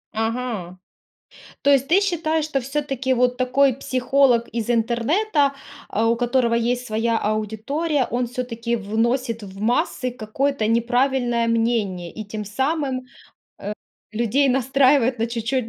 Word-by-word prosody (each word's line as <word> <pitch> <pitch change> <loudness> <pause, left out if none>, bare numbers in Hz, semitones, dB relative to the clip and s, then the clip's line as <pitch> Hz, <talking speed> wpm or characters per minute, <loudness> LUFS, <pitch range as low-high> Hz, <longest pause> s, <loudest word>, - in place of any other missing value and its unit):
Ага, 225 -5 -3 0.9
то 285 - +4
есть 275 -1 +4
ты 365 +4 +5
считаешь, 320 -5 0
что 280 -3 -1
всё-таки 270 -1 -2
вот 250 0 +2
такой 260 +1 +3
психолог 255 -2 +2
из 230 0 -3
интернета, 275 - +1 0.4
э, 215 - 0
у 230 +1 +3
которого 240 0 +1
есть 245 +2 0
своя 225 +1 0
аудитория, 225 +8 -1
он 245 +1 0
всё-таки 235 -1 -3
вносит 230 +2 -1
в 195 -1 -10
массы 250 +3 0
какое-то 255 +1 -1
неправильное 240 +1 +1
мнение, 225 -6 0
и 215 +4 -7
тем 210 +1 -6
самым, 265 +4 -1
э, 255 0 -21 0.9
людей 240 +5 +2
настраивает 265 0 +3
на 230 - +2
чуть-чуть 235 +1 -2
245 Hz, 130 wpm, -22 LUFS, 230-270 Hz, 0.9 s, ты